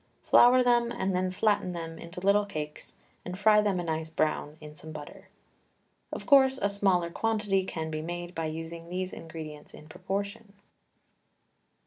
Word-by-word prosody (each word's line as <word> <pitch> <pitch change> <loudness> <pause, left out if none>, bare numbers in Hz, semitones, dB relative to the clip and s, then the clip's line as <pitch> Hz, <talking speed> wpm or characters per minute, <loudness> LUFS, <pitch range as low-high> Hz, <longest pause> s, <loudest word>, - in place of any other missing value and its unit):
Flour 250 +1 +6
them, 240 -1 +3
and 190 -5 -1
then 185 0 +1
flatten 185 -1 +1
them 165 -1 -6
into 170 +2 -8
little 200 +2 +3
cakes 150 -5 -7 0.3
and 180 +1 -6
fry 210 +1 +5
them 200 -3 0
a - - -2
nice 160 -1 -3
brown 155 -1 -1
in 150 -1 -11
some 155 +1 -10
butter. 150 -1 -10 0.8
Of - - -6
course, 265 -2 +6
a 200 0 0
smaller 185 -4 +1
quantity 210 -2 0
can 160 -3 -4
be 155 0 -3
made 175 +2 -5
by 165 -2 -2
using 165 +1 -7
these 185 +1 -3
ingredients 155 -2 -9
in 155 - -13
proportion. 200 +5 -5
180 Hz, 160 wpm, -29 LUFS, 160-205 Hz, 0.8 s, Flour